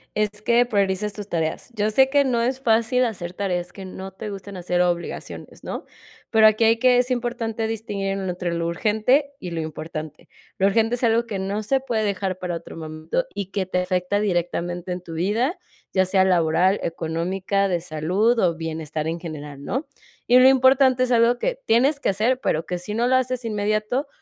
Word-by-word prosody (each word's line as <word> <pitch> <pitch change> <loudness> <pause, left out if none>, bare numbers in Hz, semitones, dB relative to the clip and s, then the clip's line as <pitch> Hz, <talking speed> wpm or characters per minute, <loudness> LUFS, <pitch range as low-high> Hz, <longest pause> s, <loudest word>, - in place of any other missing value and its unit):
es 210 0 +2
que 235 +2 +4
priorices 200 -2 0
tus 205 0 -8
tareas. 160 +5 -2
Yo 215 -1 0
sé 265 +5 +4
que 285 0 +4
no 240 -4 +1
es 255 +2 -1
fácil 235 0 +2
hacer 180 -7 -3
tareas 180 -2 -3
que 195 - -9
no 190 +1 -8
te 190 +3 -7
gusten, 200 -1 -8
hacer 180 0 -1
obligaciones, 175 -1 -4
¿no? - - -5 0.4
Pero 220 -1 +5
aquí 215 +1 +5
hay 225 +1 +4
que 250 +1 +4
es 250 +1 +1
importante 235 -2 -2
distinguir 215 -3 -3
entre 180 -2 -3
lo 170 0 -1
urgente, 220 - +1
y 180 - -6
lo 165 -1 -3
importante. 155 -1 -7 0.3
Lo 195 - +4
urgente, 225 +3 +2
es 250 - -7
algo 230 0 +3
que 210 -4 -4
no 200 +3 -2
se 270 +6 +1
puede 235 -5 -1
dejar 195 -2 -1
para 180 -2 -3
otro 165 - -11
momento, 155 - -3
y 200 -2 -4
que 195 0 -2
te 180 0 -1
afecta 180 +2 0
directamente 175 -2 -2
en 180 0 -3
tu 165 -2 -9
vida, 220 - 0 0.4
ya 190 0 +3
sea 190 +1 +3
laboral, 180 +1 +3
económica, 180 +5 -1
de 175 -3 -1
salud, 180 +9 +1
o 175 -5 +2
bienestar 160 -1 -4
en 165 +1 -2
general, 150 -4 -8
¿no? 265 +5 -2 0.4
Y 245 - +6
lo 255 - +8
importante, 260 -1 +5
es 255 - -1
algo 235 0 +4
que - - -1
tienes 270 +6 +3
que - - 0
hacer, 225 +6 +1
pero, 160 - -1
que 180 - -2
si 180 +4 -6
no 235 +3 +1
lo 260 - +3
haces 255 -1 0
inmediato, 215 +5 -1
200 Hz, 200 wpm, -23 LUFS, 175-235 Hz, 0.4 s, lo